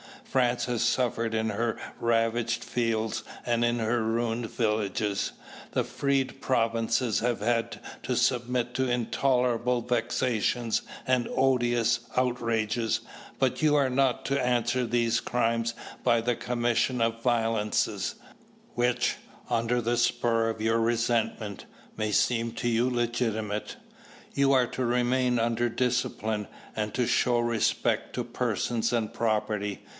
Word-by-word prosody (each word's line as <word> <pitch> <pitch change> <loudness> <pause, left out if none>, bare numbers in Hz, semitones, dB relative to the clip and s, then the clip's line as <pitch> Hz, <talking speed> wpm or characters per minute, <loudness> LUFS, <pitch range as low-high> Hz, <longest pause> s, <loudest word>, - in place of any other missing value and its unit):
"France 125 - +1
has 120 -2 -1
suffered 120 -1 +1
in 110 0 0
her 115 +2 -1 0.2
ravaged 115 0 +1
fields 115 -2 -1 0.2
and 120 0 +2
in 120 0 +1
her 115 +1 +1
ruined 115 +1 -1
villages. 105 -2 -1 0.4
The - - +2
freed 135 -1 -1
provinces 115 -1 +1
have 120 -2 -1
had 115 +1 0 0.2
to - - -1
submit 125 -1 +1
to 130 0 +1
intolerable 125 0 +1
vexations 120 -1 0 0.2
and 130 -2 +2
odious 120 -3 +2 0.2
outrages, 115 -2 0 0.4
but 130 +1 +1
you 150 -1 +4
are 140 -3 +3
not 130 -1 +1
to 140 0 +1
answer 125 0 +1
these 115 0 +2
crimes 115 -1 0 0.3
by 115 -1 +3
the 120 +1 0
commission 120 +1 0
of 115 0 0
violences, 115 -3 0 0.6
which, 125 0 +1 0.3
under 115 +1 +1
the 120 +1 0
spur 115 -1 +2
of 110 -1 -4
your 115 +1 +2
resentment, 115 -2 0 0.3
may 110 -1 -1
seem 115 +2 +1
to 120 +1 -1
you 120 +2 +2
legitimate. 115 -3 -1 0.6
"You 140 0 +3
are 130 -2 +4
to 130 - -3
remain 125 +1 +2
under 115 +1 +1
discipline 115 -3 -1 0.3
and 105 -1 -2
to 125 - +1
show 120 +1 +2
respect 120 -1 0
to - - -1
persons 120 0 -1
and 115 -3 -1
property. 105 -2 -1
120 Hz, 130 wpm, -28 LUFS, 115-125 Hz, 0.6 s, you